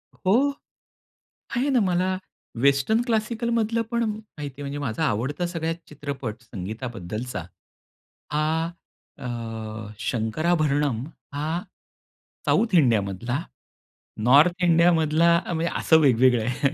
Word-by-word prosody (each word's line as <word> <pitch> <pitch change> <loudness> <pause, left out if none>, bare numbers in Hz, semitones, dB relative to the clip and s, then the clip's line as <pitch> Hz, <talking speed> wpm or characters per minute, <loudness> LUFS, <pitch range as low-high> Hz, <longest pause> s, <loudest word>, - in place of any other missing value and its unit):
हो. 250 +10 +2 1.0
आहे 265 +4 +1
ना, 260 -3 +4
मला 185 -1 +1 0.4
वेस्टर्न 140 - +3
क्लासिकलमधलं 230 0 0
पण 235 0 +1
माहिती 210 -10 -6
आहे. 140 - -11
म्हणजे 140 +1 -4
माझा 140 +2 -2
आवडता 140 - -1
सगळ्यात 165 -1 -2
चित्रपट 140 -6 -5
संगीताबद्दलचा 110 -1 -5 0.9
हा 160 +2 +1 0.5
अ, - - -8 0.7
शंकराभरणम 140 +3 0 0.3
हा 145 +2 -2 1.0
साउथ 230 -2 +2
इंडियामधला, 120 - +2 0.9
नॉर्थ 160 +8 +5
इंडियामधला 170 -1 +4 0.2
म्हणजे 170 0 -1
असं 160 - +5
वेगवेगळं 125 -3 +4
आहे. 125 +4 +1
150 Hz, 95 wpm, -25 LUFS, 125-180 Hz, 1.0 s, नॉर्थ